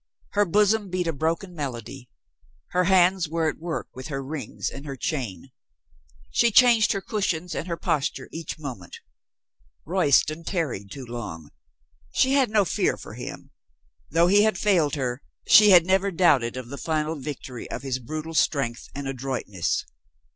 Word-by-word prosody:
Her 205 0 +3
bosom 205 +2 +2
beat 180 0 -1
a 165 - -1
broken 165 +5 -2
melody. 130 -4 -6 0.6
Her 180 0 +2
hands 185 -2 +4
were 165 0 0
at - - -3
work 165 0 -4
with 130 0 -8
her 135 -3 -4
rings 135 -4 -5
and 140 - -9
her 135 - -4
chain. 125 - -4 0.8
She 235 - +4
changed 235 -1 +5
her 195 - -3
cushions 180 -5 -2
and 165 - -4
her 170 -1 -3
posture 145 -2 -1
each 165 0 -6
moment. 125 - -8 0.9
Royston 155 +3 +2
tarried 145 - -3
too 135 +2 -8
long. 105 -11 -7 0.6
She 265 - +3
had 275 -4 +3
no 210 -2 +3
fear 155 - 0
for - - -10
him. - - -8 0.6
Though 165 +3 +4
he 205 +4 +5
failed 180 -7 +1
her, 125 -2 -3 0.2
she 210 0 +8
had 175 -4 +8
never 190 +2 +2
doubted 140 -10 +2
of 125 -2 -7
the 140 - -7
final 155 -1 -1
victory 130 -3 -7
of - - -5
his 130 -2 -2
brutal 155 +6 -6
strength 135 -6 0
and 140 -1 -4
adroitness. 130 -9 -2
155 Hz, 160 wpm, -25 LUFS, 130-185 Hz, 0.9 s, she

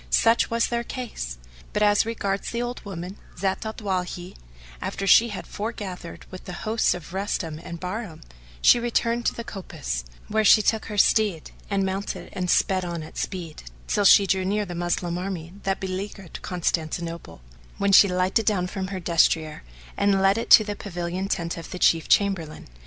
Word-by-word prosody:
Such 230 - +3
was 230 0 +2
their 235 0 -1
case; 225 - -5 0.4
but 210 - +1
as 205 +1 +4
regards 200 -4 -2
the 235 - -3
old 245 +1 -5
woman, 185 0 -7 0.2
Zat 190 +3 -1
al 220 - -5
Dawahi, 180 -3 -3 0.5
after 195 - -3
she 230 +4 +6
had 205 - -6
foregathered 200 -5 -6
with 185 - -9
the 180 - -6
hosts 220 +1 +2
of 175 0 -10
Rustam 190 -5 -2
and 170 0 -8
Bahram, 185 -1 -5 0.4
she 240 - +7
returned 235 0 0
to - - 0
the 235 - -5
coppice, 65 - -5 0.2
where 220 +1 +1
she 215 0 +7
took 220 0 +1
her 210 - -6
steed 205 -5 +2 0.2
and 200 -1 +1
mounted 190 +1 -4
and 180 -1 -2
sped 185 +1 +2
on 170 -2 -4
at 155 - -12
speed, 175 -5 -5 0.2
till 205 - +1
she 200 +1 +8
drew 190 0 +1
near 205 +2 0
the 175 - -7
Moslem 175 0 -1
army 180 -3 -5
that 195 0 0
beleaguered 190 -1 -6
Constantinople, 165 - -3 0.4
when 200 0 +1
she 200 +1 +8
lighted 185 +4 +1
down 195 -5 +2
from 190 0 -4
her 190 -1 -4
destrier 165 -2 +2 0.3
and 200 -1 +2
led 195 +1 +4
it 230 - -3
to 215 - +9
the 205 -1 -4
pavilion 180 -1 -4
tent 170 -4 -2
of 165 - -8
the - - -6
Chief 165 -2 +3
Chamberlain. 190 -6 +1
190 Hz, 180 wpm, -25 LUFS, 175-210 Hz, 0.5 s, to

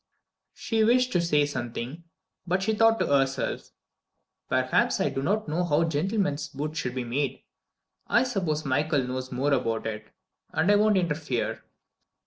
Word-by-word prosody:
She 225 -2 0
wished 250 +3 +3
to 175 - +2
say 150 -4 +2
something, 125 +3 -5 0.4
but 185 +2 +1
she 220 - +1
thought 225 +1 +4
to - - +2
herself: 135 -1 0 0.8
"Perhaps 130 0 +2
I - - +2
do 135 0 -3
not 205 +8 0
understand 175 +3 -1
how 150 +2 +3
gentleman's 165 -1 -1
boots 150 +3 -4
should 125 -4 -3
be 130 - -2
made. 130 +2 -2 0.6
I 235 - +4
suppose 180 -12 -2
Michael 145 +1 +1
knows 130 +1 -4
more 135 +3 +1
about 115 -4 0
it 110 -1 -5 0.5
and 165 +6 +3
I - - +6
won't 210 -1 +4
interfere." 150 -8 -1
150 Hz, 155 wpm, -27 LUFS, 130-190 Hz, 0.8 s, I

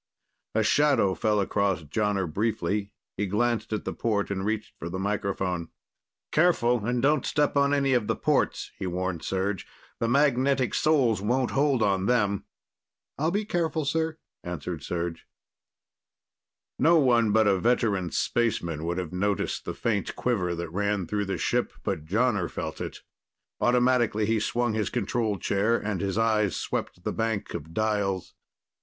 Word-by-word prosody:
A 110 - +3
shadow 140 -6 +3
fell 105 +4 +1
across 100 -3 0
Jonner 100 +5 0
briefly. 100 +2 -1 0.3
He 105 +1 0
glanced 115 +4 0
at 110 - -2
the - - -2
port 105 -3 -1
and 95 -1 -2
reached 110 +1 -2
for 85 - -5
the 95 - -4
microphone. 95 -3 -2 0.6
"Careful 125 -9 +3
and 120 +2 0
don't 145 -1 +3
step 145 -1 +1
on 140 0 +3
any 140 -2 +2
of 120 -4 +1
the 115 - +1
ports," - - 0
he 95 - -2
warned 90 -1 -2
Serj. 95 +2 -1 0.4
"The 115 - 0
magnetic 135 0 +2
soles 130 -10 +2
won't 125 +5 +1
hold 135 -4 +2
on 95 -2 +1
them." 105 -5 +1 0.7
"I'll 155 +3 +2
be 205 +4 -1
careful, 165 -5 -1
sir," 160 +2 0 0.3
answered 90 -1 -4
Serj. 85 0 -3 1.6
No 170 +2 +5
one 120 -7 +4
but 110 +1 +4
a 100 -2 +3
veteran 105 -5 +1
spaceman 85 -11 -1
would 85 +1 -2
have 90 -3 -4
noticed 100 +2 -1
the - - -4
faint 105 -4 -1
quiver 90 -8 0
that 85 -1 -5
ran 100 0 0
through 105 +3 -1
the 95 - -2
ship, - - 0
but 75 - -2
Jonner 100 0 +1
felt - - -5
it. - - -6 0.6
Automatically, 120 -3 +3
he 110 +1 +1
swung 120 +1 0
his 110 -2 0
control 110 -2 -1
chair 100 +6 +1
and 105 -4 -3
his 100 0 -1
eyes 110 -3 +2
swept 90 - -4
the - - -2
bank 115 -2 -2
of 80 +3 -6
dials. 105 -4 0
105 Hz, 160 wpm, -27 LUFS, 95-120 Hz, 1.6 s, No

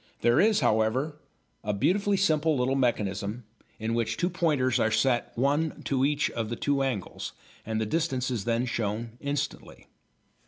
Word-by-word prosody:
There 120 0 +4
is, 215 0 +4
however, 120 +8 +1 0.5
a 105 - -1
beautifully 200 - +2
simple 160 -5 +2
little 125 +1 +1
mechanism 105 -3 -1 0.3
in 110 +1 -2
which 115 -1 0
two 175 - 0
pointers 150 -8 +1
are 110 - +3
set 120 +1 +1
one 145 +5 0
to 135 -2 0
each 145 0 +1
of 115 -2 -3
the 120 - -2
two 140 +3 0
angles, 125 -8 -3 0.3
and 110 -1 -1
the 110 - 0
distance 135 -1 -1
is 115 -6 -2
then 115 +1 +1
shown 115 -1 -2
instantly. 140 0 -4
125 Hz, 160 wpm, -28 LUFS, 115-150 Hz, 0.5 s, There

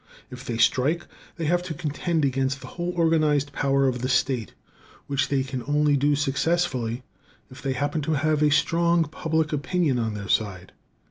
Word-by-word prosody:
If 125 0 -9
they 120 -4 -3
strike, 145 +8 +2 0.3
they 165 - -4
have 175 +3 +2
to 175 -3 -6
contend 155 +1 -1
against 135 0 0
the - - -9
whole 175 0 -4
organized 155 -4 +2
power 140 -1 +2
of 125 -2 -1
the 130 - -1
state, 130 -4 0 0.5
which 140 0 -1
they 135 -2 +1
can 130 -1 -5
only 145 0 +3
do 145 +1 +2
successfully 135 -4 0 0.5
if 130 - -11
they 135 -1 -1
happen 145 +4 -1
to 155 +2 -1
have 155 +1 +1
a 150 - +5
strong 170 +3 +3
public 160 0 -1
opinion 150 -2 0
on 110 -2 -2
their 100 -1 -6
side. 95 -5 -1
145 Hz, 180 wpm, -25 LUFS, 130-160 Hz, 0.5 s, a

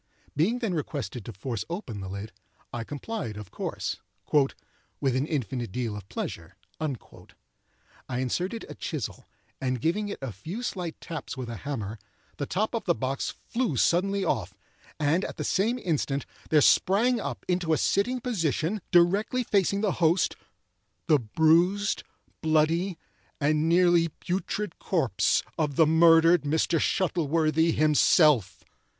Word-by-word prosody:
Being 190 - +2
then 225 -7 -2
requested 135 - -4
to - - -6
force 110 +2 -4
open 170 - -5
the 95 -1 -6
lid, 100 +3 -6 0.4
I 120 - -3
complied, 140 - -5
of 105 -3 -9
course, - - -3 1.0
"with 135 -3 +1
an 135 +3 0
infinite 125 - -2
deal 115 -2 -2
of 100 -2 -9
pleasure." - - -5 0.2
I 125 - -9
inserted 180 - -2
a - - -8
chisel, 150 -8 -5 0.3
and 130 -1 -1
giving 205 - 0
it - - -4
a 135 -3 -4
few 170 - -7
slight 180 -8 -4
taps 165 -4 -6
with 125 -2 -5
a 115 - -5
hammer, 110 -5 -5 0.4
the 145 - -3
top 215 +6 -1
of 230 - -2
the 170 - +2
box 135 +1 -2
flew 235 - -2
suddenly 195 - +2
off, 110 - -1 0.4
and 155 +5 +2
at - - -5
the - - -3
same 220 +6 +1
instant, 145 - -1 0.2
there 155 -2 +5
sprang 230 - +4
up - - -5
into 180 -2 0
a 155 - +4
sitting 245 - +1
position, 190 - -1
directly 200 +8 +3
facing 200 -2 +1
the 210 -3 +2
host, 165 +2 +3 0.7
the 155 -4 +4
bruised, 165 - +2 0.4
bloody, 160 +3 +2 0.4
and 155 +2 +2
nearly 175 -1 +4
putrid 185 +3 -4
corpse 135 - +1 0.2
of 150 -3 0
the 160 - +6
murdered 165 +1 +6
Mr. 160 +2 +1
Shuttleworthy 160 -2 +2
himself. 150 - +4
160 Hz, 145 wpm, -27 LUFS, 130-185 Hz, 1.0 s, the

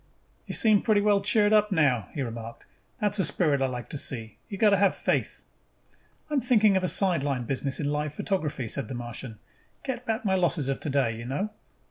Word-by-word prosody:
"You - - -3
seem 215 -3 +4
pretty 215 -3 +3
well 205 -1 +3
cheered 210 0 +3
up 210 0 +4
now," 140 - +2
he 140 - -1
remarked. 115 -1 -7 0.3
"That 205 -1 0
is 205 - -1
a - - +3
spirit 150 -4 +1
I 135 - +2
like 125 -3 -5
to 145 - -4
see. 115 -6 -4
You 200 - -5
have - - -12
got 215 - +6
to 200 - +4
have 195 0 +3
faith." - - -1 0.8
"I'm 295 -3 0
thinking 220 -4 +4
of 190 - +1
a - - +1
sideline 145 -10 +1
business 135 +2 -2
in 145 - -1
live 150 0 -1
photography," 155 - -2
said 140 +5 -3
the 130 - -6
Martian. 120 -1 -6 0.5
"Get 250 -2 -4
back 225 +1 -2
my 190 - +2
losses 170 -6 +1
of 135 - -1
today, 135 -6 0
you 115 +2 -7
know." 190 +11 -2
155 Hz, 215 wpm, -27 LUFS, 130-205 Hz, 0.8 s, got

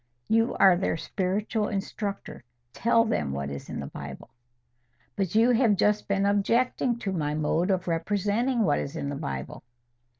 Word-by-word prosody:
"You 225 +2 +2
are 190 -2 +6
their 175 -2 -1
spiritual 205 +5 -1
instructor: 200 - -4 0.3
tell 230 0 +3
them 75 - -1
what 70 0 -3
is 70 - -7
in - - -5
the - - -4
Bible." - - -9 0.8
"But 195 -1 -2
you 230 +3 +5
have 230 -3 +4
just 210 +2 +1
been 200 0 +1
objecting 235 +4 +1
to 205 -4 -3
my 150 -5 -1
mode 155 +4 0
of 185 -2 0
representing 205 +8 0
what 150 -7 +2
is 140 - -5
in 140 -3 -3
the 145 - -3
Bible." 65 - -5
200 Hz, 165 wpm, -27 LUFS, 165-220 Hz, 0.8 s, are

